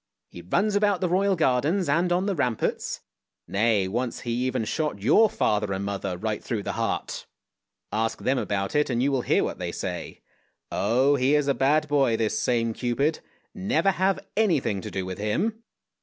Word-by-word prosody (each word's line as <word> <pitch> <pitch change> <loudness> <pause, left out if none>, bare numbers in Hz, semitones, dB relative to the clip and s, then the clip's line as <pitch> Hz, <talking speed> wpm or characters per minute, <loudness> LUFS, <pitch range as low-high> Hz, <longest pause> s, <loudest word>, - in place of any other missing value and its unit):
He 85 - -10
runs 200 - 0
about 205 -2 +2
the 185 - 0
Royal 190 +2 +2
Gardens 160 +5 +1
and 170 +5 +2
on 180 +2 +2
the 200 - 0
ramparts; 125 - -1 0.5
nay, 105 -1 +2
once 120 +5 -3
he 120 - -4
even 125 -1 -1
shot 150 -4 -2
your 210 - +5
father 105 - 0
and 95 +1 -3
mother 100 -2 -3
right 110 +2 -3
through 110 -5 -3
the - - -2
heart! - - -3 0.6
Ask 110 +1 -1
them 130 0 0
about 100 -3 -2
it 150 -1 +2
and 120 -1 0
you 140 - +2
will 135 -2 +1
hear - - +2
what - - -4
they - - -3
say. - - -5 0.5
Oh! 130 +7 +2
he 135 +3 +3
is 150 -1 +1
a 140 - +3
bad 150 +3 +2
boy 135 -6 +2
this 110 -1 0
same 115 -2 +1
Cupid. 130 +7 0 0.3
Never 195 0 +1
have 190 +1 0
anything 160 - +1
to - - -6
do 95 -1 -3
with 95 +1 -6
him 210 - -1
130 Hz, 185 wpm, -25 LUFS, 110-175 Hz, 0.6 s, your